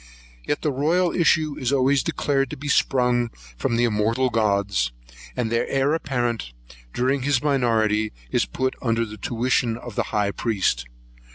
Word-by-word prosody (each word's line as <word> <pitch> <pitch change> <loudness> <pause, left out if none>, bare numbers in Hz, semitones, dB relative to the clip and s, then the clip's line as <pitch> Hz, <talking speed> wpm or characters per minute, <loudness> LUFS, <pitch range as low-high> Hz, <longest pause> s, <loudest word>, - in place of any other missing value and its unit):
Yet 145 - -1
the 150 - +1
royal 165 +6 +2
issue 155 -3 +2
is 130 -1 -1
always 135 0 +3
declared 135 -2 0
to - - -6
be 145 +3 -7
sprung 125 -3 +2 0.3
from 115 - -1
the 120 - +2
immortal 115 +3 +1
Gods; 100 - +1 0.5
and 115 -3 -1
the 115 - 0
heir 135 +2 +2
apparent, 120 - -2 0.4
during 130 - 0
his 130 -1 +1
minority, 110 -6 +2 0.2
is - - +1
put 130 0 -2
under 115 -1 +1
the 110 -1 -9
tuition 120 0 0
of 120 -1 -9
the - - -1
high 105 -1 +1
priest. 95 - 0
120 Hz, 160 wpm, -23 LUFS, 110-135 Hz, 0.5 s, always